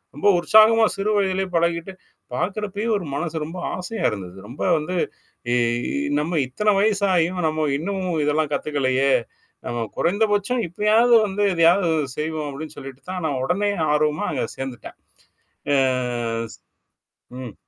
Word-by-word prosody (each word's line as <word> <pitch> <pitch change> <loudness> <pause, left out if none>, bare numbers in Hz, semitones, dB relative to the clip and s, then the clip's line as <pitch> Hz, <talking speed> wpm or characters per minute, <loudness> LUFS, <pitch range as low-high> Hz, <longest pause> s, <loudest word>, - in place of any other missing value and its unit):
ரொம்ப 150 - 0
உற்சாகமா 220 +4 +6
சிறு 200 +2 0
வயதிலேயே 190 -1 0
பழகிட்டு, 170 +2 0 0.4
பார்க்கறப்பயே 205 - -2
ஒரு 190 - -6
மனசு 160 +1 -3
ரொம்ப 165 +4 -8 0.2
ஆசையா 185 +5 -5
இருந்தது. 95 -3 -7
ரொம்ப 125 +6 -10 0.2
வந்து 155 +4 -3 0.6
இ - - +3 0.6
நம்ம 160 +1 0
இத்தன 210 +11 +1
வயசாயும் 190 -4 +2
நம்ம 155 0 -1
இன்னமும் 180 -2 -2
இதெல்லாம் 150 0 0
கத்துக்கலையே! 135 -2 +1 0.5
நம்ம 120 -1 -2
குறைந்தபட்சம் 210 +5 +1
இப்பயாவது 215 +6 +3
வந்து 205 +1 -1
இதையாவது 170 +2 +4 0.3
செய்வோம் 155 -1 -3
அப்படின்னு 150 +3 -8
சொல்லிட்டு 135 -1 -9
தான் 180 - -4
நான் 135 -4 -1
உடனே 200 +8 +1 0.2
ஆர்வமா 150 +1 +1
அங்க 135 - -1
சேர்ந்துட்டேன். 130 -4 -7 0.8
ஆ - - +4 0.8
ஸ் - - -29 0.8
ம். 120 -5 -7
170 Hz, 130 wpm, -22 LUFS, 150-200 Hz, 0.8 s, உற்சாகமா